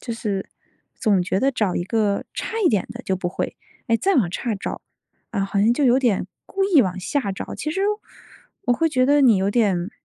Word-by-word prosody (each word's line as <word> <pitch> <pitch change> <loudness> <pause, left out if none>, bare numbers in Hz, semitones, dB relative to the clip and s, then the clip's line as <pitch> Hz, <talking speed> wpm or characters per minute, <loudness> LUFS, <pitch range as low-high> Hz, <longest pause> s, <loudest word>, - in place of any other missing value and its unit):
就 235 - -5
是 205 -3 -3 0.5
总 200 -6 +2
觉 190 +2 -1
得 270 - +3
找 210 -8 0
一 - - 0
个 205 0 0
差 - - -4
一 - - +6
点 210 -5 +1
的 - - -9
就 190 - -1
不 180 -1 -2
会， 175 - -4 0.3
诶， 230 - +4
再 390 +11 +1
往 210 - +2
差 225 +4 -2
找， 195 - -5 0.5
啊， 200 -3 -1
好 195 +1 -2
像 215 +4 +4
就 295 - -1
有 250 0 +5
点 230 -9 +1 0.2
故 390 - -2
意 370 -7 +5
往 185 -2 -3
下 220 +1 -1
找， 190 - -6
其 305 - -3
实 385 - -2 0.9
我 245 - +4
会 325 +7 +2
觉 255 -4 +2
得 290 +1 +4
你 240 -6 +6
有 190 +1 +1
点 200 -5 +1
220 Hz, 240 characters per minute, -22 LUFS, 195-260 Hz, 0.9 s, 一